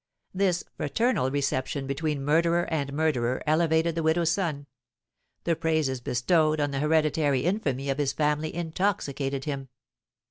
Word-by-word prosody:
This 185 Hz, -2 st, +1 dB
fraternal 150 Hz, -, +1 dB
reception 135 Hz, 0 st, -1 dB
between 140 Hz, 0 st, -2 dB
murderer 170 Hz, +3 st, +3 dB
and 140 Hz, -3 st, -1 dB
murderer 135 Hz, -5 st, 0 dB
elevated 160 Hz, +1 st, +2 dB
the 165 Hz, -, -2 dB
widow's 160 Hz, +1 st, +2 dB
son; 165 Hz, -6 st, -2 dB, 0.8 s
the 170 Hz, -, +1 dB
praises 155 Hz, -6 st, 0 dB
bestowed 155 Hz, +6 st, +2 dB
on 145 Hz, -1 st, 0 dB
the 135 Hz, -, -2 dB
hereditary 150 Hz, -2 st, +2 dB
infamy 140 Hz, -, -1 dB
of 135 Hz, +1 st, -1 dB
his 140 Hz, -2 st, +1 dB
family 150 Hz, +1 st, 0 dB
intoxicated 155 Hz, -6 st, -2 dB
him. 135 Hz, -3 st, -4 dB
150 Hz, 135 wpm, -27 LUFS, 140-165 Hz, 0.8 s, murderer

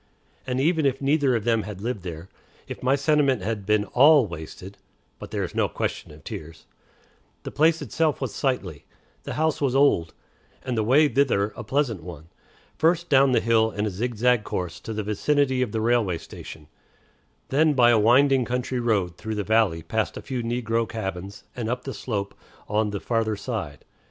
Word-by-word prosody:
And 125 Hz, 0 st, -1 dB
even 160 Hz, +1 st, +2 dB
if 135 Hz, 0 st, -1 dB
neither 140 Hz, -2 st, +2 dB
of 115 Hz, -, -1 dB
them 115 Hz, -1 st, +2 dB
had 105 Hz, -1 st, -8 dB
lived 115 Hz, 0 st, -3 dB
there, 85 Hz, -1 st, -7 dB, 0.4 s
if -, -, -7 dB
my 130 Hz, +2 st, +3 dB
sentiment 140 Hz, -5 st, +2 dB
had 105 Hz, -2 st, -3 dB
been 105 Hz, -1 st, +2 dB
all 140 Hz, +5 st, +5 dB
wasted 85 Hz, +2 st, -9 dB, 0.4 s
(but -, -, -9 dB
there -, -, -2 dB
was -, -, -5 dB
no -, -, +1 dB
question -, -, -4 dB
of 75 Hz, 0 st, -15 dB
tears), 80 Hz, +1 st, -9 dB, 0.8 s
the -, -, -6 dB
place 160 Hz, +1 st, +2 dB
itself 155 Hz, +4 st, 0 dB
was -, -, -4 dB
sightly, 100 Hz, -, -2 dB, 0.4 s
the -, -, -4 dB
house 160 Hz, -1 st, 0 dB
was 135 Hz, -2 st, +1 dB
old, 135 Hz, -, +3 dB, 0.5 s
and 125 Hz, -2 st, -2 dB
the 110 Hz, -, +1 dB
way 140 Hz, +7 st, +5 dB
thither 120 Hz, -6 st, +1 dB
a 120 Hz, -, -7 dB
pleasant 120 Hz, -, -1 dB
one 80 Hz, -2 st, -10 dB, 0.5 s
first 170 Hz, +1 st, +2 dB
down 135 Hz, -1 st, +5 dB
the 125 Hz, -, +4 dB
hill 110 Hz, -1 st, +3 dB
in 105 Hz, 0 st, -3 dB
a 105 Hz, -, -2 dB
zigzag 120 Hz, +3 st, +1 dB
course 90 Hz, -5 st, -4 dB
to -, -, -7 dB
the 110 Hz, -1 st, -3 dB
vicinity 130 Hz, +5 st, +1 dB
of 125 Hz, -4 st, -1 dB
the 110 Hz, -, -2 dB
railway 110 Hz, -6 st, +1 dB
station, 80 Hz, -1 st, -11 dB, 0.8 s
then 150 Hz, +2 st, +3 dB
by 120 Hz, -2 st, +6 dB
a 115 Hz, -, +4 dB
winding 130 Hz, +4 st, +4 dB
country 125 Hz, +1 st, -2 dB
road 100 Hz, -8 st, 0 dB
through 110 Hz, 0 st, -5 dB
the 105 Hz, -, -2 dB
valley 105 Hz, -7 st, +2 dB
past 110 Hz, +6 st, -2 dB
a -, -, -8 dB
few 130 Hz, -2 st, -3 dB
negro 115 Hz, -1 st, -1 dB
cabins, 100 Hz, -3 st, -6 dB
and 115 Hz, -3 st, -3 dB
up 125 Hz, +1 st, -2 dB
the 135 Hz, -, -5 dB
slope 100 Hz, -5 st, -4 dB, 0.3 s
on 105 Hz, +1 st, 0 dB
the 100 Hz, -1 st, -4 dB
farther 115 Hz, -1 st, -1 dB
side. 100 Hz, -, -5 dB
115 Hz, 190 wpm, -24 LUFS, 100-135 Hz, 0.8 s, by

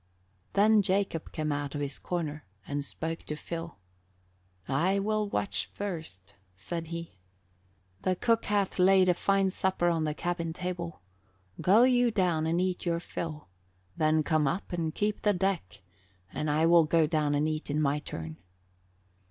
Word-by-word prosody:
Then 210 Hz, +1 st, +5 dB
Jacob 195 Hz, -4 st, -1 dB
came 155 Hz, -1 st, -2 dB
out 145 Hz, 0 st, -3 dB
of 145 Hz, -, -2 dB
his 140 Hz, -1 st, -3 dB
corner 155 Hz, -4 st, -3 dB, 0.2 s
and 145 Hz, 0 st, -3 dB
spoke 165 Hz, +3 st, -4 dB
to 150 Hz, -, -4 dB
Phil. 165 Hz, +2 st, -6 dB, 0.9 s
"I 170 Hz, +9 st, +2 dB
will 210 Hz, +1 st, 0 dB
watch 200 Hz, -, -1 dB
first," 160 Hz, -, -6 dB, 0.2 s
said 165 Hz, -, -5 dB
he. 170 Hz, -, -7 dB, 0.8 s
"The 185 Hz, -, +1 dB
cook 230 Hz, +4 st, +1 dB
hath 200 Hz, -2 st, 0 dB
laid 185 Hz, 0 st, +6 dB
a -, -, +6 dB
fine 195 Hz, +2 st, +2 dB
supper 185 Hz, -2 st, +1 dB
on 165 Hz, -2 st, +1 dB
the 150 Hz, -1 st, -2 dB
cabin 170 Hz, -1 st, -2 dB
table. 175 Hz, -, -5 dB, 0.6 s
Go 210 Hz, +6 st, +6 dB
you 245 Hz, -1 st, +4 dB
down 180 Hz, -7 st, +1 dB
and 165 Hz, +2 st, +1 dB
eat 185 Hz, 0 st, -1 dB
your 170 Hz, -1 st, 0 dB
fill, 155 Hz, -3 st, -6 dB, 0.5 s
then 155 Hz, 0 st, +2 dB
come 155 Hz, -1 st, +2 dB
up 175 Hz, +6 st, -3 dB
and 165 Hz, -2 st, -1 dB
keep 210 Hz, 0 st, -1 dB
the 210 Hz, -, +3 dB
deck 180 Hz, -, -2 dB, 0.5 s
and 150 Hz, -, -2 dB
I 155 Hz, +2 st, +3 dB
will 170 Hz, -1 st, +6 dB
go 160 Hz, +1 st, +3 dB
down 150 Hz, -2 st, +1 dB
and 150 Hz, +2 st, +2 dB
eat 155 Hz, -1 st, -3 dB
in 145 Hz, +1 st, 0 dB
my 145 Hz, -1 st, +1 dB
turn." 80 Hz, -, -7 dB
170 Hz, 160 wpm, -29 LUFS, 150-190 Hz, 0.9 s, laid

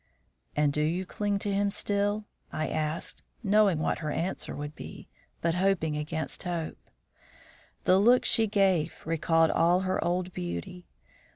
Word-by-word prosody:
"And 150 Hz, -1 st, +2 dB
you 150 Hz, -, +2 dB
do 180 Hz, +4 st, -1 dB
cling 205 Hz, +1 st, -1 dB
to 200 Hz, 0 st, -1 dB
him 200 Hz, +1 st, +2 dB
still?" 205 Hz, +1 st, 0 dB, 0.3 s
I 155 Hz, -, -2 dB
asked, 155 Hz, 0 st, -3 dB, 0.2 s
knowing 205 Hz, -4 st, +4 dB
what 155 Hz, -, 0 dB
her 155 Hz, -, -3 dB
answer 175 Hz, +5 st, -3 dB
would 145 Hz, +1 st, -6 dB
be, -, -, -10 dB, 0.3 s
but 170 Hz, 0 st, +1 dB
hoping 180 Hz, -4 st, +1 dB
against 155 Hz, +1 st, -3 dB
hope. 170 Hz, -3 st, -3 dB, 1.0 s
The 185 Hz, -, +5 dB
look 240 Hz, +5 st, +5 dB
she 225 Hz, -2 st, +4 dB
gave 190 Hz, -6 st, +2 dB
recalled 165 Hz, 0 st, +3 dB
all 175 Hz, +2 st, +3 dB
her 185 Hz, 0 st, 0 dB
old 180 Hz, +1 st, -1 dB
beauty. 90 Hz, -, -5 dB
175 Hz, 150 wpm, -29 LUFS, 155-200 Hz, 1.0 s, The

